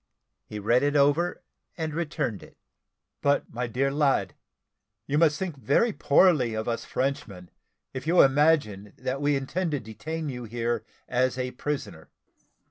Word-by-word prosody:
He 105 Hz, -, -7 dB
read 115 Hz, +5 st, +2 dB
it 145 Hz, +1 st, +1 dB
over, 145 Hz, +5 st, +2 dB, 0.3 s
and 160 Hz, -2 st, -3 dB
returned 150 Hz, -, -2 dB
it. -, -, -16 dB, 0.6 s
"But, 145 Hz, 0 st, +1 dB
my 120 Hz, +1 st, -2 dB
dear 135 Hz, +4 st, 0 dB
lad, 140 Hz, -1 st, +1 dB, 0.7 s
you 145 Hz, +3 st, 0 dB
must 155 Hz, -2 st, +4 dB
think 185 Hz, -5 st, -4 dB
very 145 Hz, -, +2 dB
poorly 140 Hz, -9 st, +3 dB
of 110 Hz, 0 st, -3 dB
us 115 Hz, -1 st, -2 dB
Frenchmen, 130 Hz, -10 st, -3 dB, 0.4 s
if 130 Hz, +3 st, -6 dB
you 175 Hz, +2 st, +6 dB
imagine 135 Hz, -8 st, +2 dB
that 135 Hz, +2 st, -3 dB
we 145 Hz, 0 st, +2 dB
intend 165 Hz, +7 st, -2 dB
to 145 Hz, -, 0 dB
detain 155 Hz, +9 st, -6 dB
you 125 Hz, -3 st, -5 dB
here 115 Hz, 0 st, -2 dB, 0.2 s
as 130 Hz, 0 st, +1 dB
a 125 Hz, 0 st, -2 dB
prisoner. 145 Hz, +3 st, -5 dB
135 Hz, 150 wpm, -26 LUFS, 120-150 Hz, 0.7 s, you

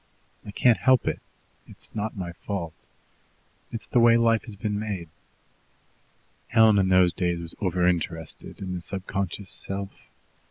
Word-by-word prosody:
I -, -, -10 dB
can't 115 Hz, +3 st, +3 dB
help 130 Hz, -2 st, +4 dB
it. -, -, 0 dB, 0.5 s
It's -, -, -11 dB
not 110 Hz, 0 st, -3 dB
my 90 Hz, -2 st, -4 dB
fault. 85 Hz, -1 st, -5 dB, 1.0 s
It's 115 Hz, -, -6 dB
the 120 Hz, -, +2 dB
way 115 Hz, 0 st, +6 dB
life 115 Hz, -1 st, +3 dB
has 110 Hz, -, -9 dB
been 105 Hz, +1 st, -2 dB
made." 100 Hz, -6 st, -4 dB, 1.4 s
Helen 110 Hz, -3 st, +5 dB
in 95 Hz, -1 st, +2 dB
those 90 Hz, -2 st, +5 dB
days 85 Hz, 0 st, -1 dB
was 85 Hz, -1 st, -8 dB
over 90 Hz, -2 st, +1 dB
interested 80 Hz, -1 st, -2 dB
in 95 Hz, -1 st, -4 dB
the 90 Hz, -, -4 dB
subconscious 95 Hz, +1 st, -4 dB
self. 100 Hz, 0 st, -3 dB
95 Hz, 150 wpm, -26 LUFS, 90-110 Hz, 1.4 s, way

